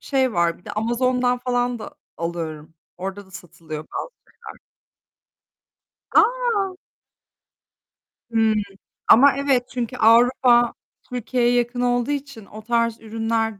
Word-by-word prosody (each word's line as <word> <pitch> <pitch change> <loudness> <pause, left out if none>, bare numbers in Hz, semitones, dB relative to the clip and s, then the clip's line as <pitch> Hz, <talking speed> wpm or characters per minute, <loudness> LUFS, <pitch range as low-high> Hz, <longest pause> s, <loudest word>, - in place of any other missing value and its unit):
Şey 265 -3 0
var, 170 -2 +1
bir 175 - -26
de - - -7
Amazon'dan 250 +3 0
falan 245 -1 -1
da 295 +7 -9 0.2
alıyorum. 160 -2 -5 0.2
Orada 195 +1 -6
da - - -21
satılıyor 165 -4 -9
bazı - - -6 0.4
şeyler. 440 - -10 1.6
A! 455 -7 +2 1.5
Hımm, 220 -1 +2 0.5
ama 275 +5 +7
evet 270 -3 +1
çünkü 245 0 -4
Avrupa 240 +1 +4 0.4
Türkiye'ye 245 0 0
yakın 245 0 0
olduğu 245 +2 +1
için 275 -6 -5
o 215 +3 -11
tarz 230 0 0
ürünler 225 -1 -2
240 Hz, 115 wpm, -22 LUFS, 215-255 Hz, 1.6 s, ama